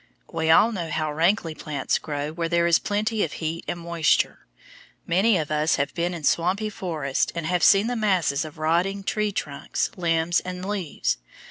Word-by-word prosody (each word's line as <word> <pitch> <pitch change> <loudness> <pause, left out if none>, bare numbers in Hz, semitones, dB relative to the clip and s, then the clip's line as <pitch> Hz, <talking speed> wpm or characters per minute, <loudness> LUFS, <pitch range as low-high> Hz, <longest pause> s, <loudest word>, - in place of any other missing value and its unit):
We 160 0 0
all 210 +8 +6
know 175 -7 -4
how 155 -1 -1
rankly 165 +1 +1
plants 145 -3 -2
grow 145 -1 -4
where 165 +1 -3
there 170 0 +2
is 170 -1 +4
plenty 210 +1 0
of 155 - -3
heat 165 +1 -4
and 175 - -3
moisture. 170 -2 +1 0.6
Many 195 +5 +3
of 155 -2 -3
us 150 +1 +2
have 140 - -1
been 175 +1 -1
in 165 - -8
swampy 185 +8 +1
forests 155 -9 -2
and 170 -2 -3
have 180 +1 0
seen 200 0 +6
the 245 +1 -1
masses 185 -10 +1
of 155 +1 -9
rotting 175 +6 0
tree 210 +1 0
trunks, 145 -7 -3
limbs, 165 0 +1
and 180 0 -6
leaves. 190 - -2
170 Hz, 185 wpm, -24 LUFS, 155-195 Hz, 0.6 s, all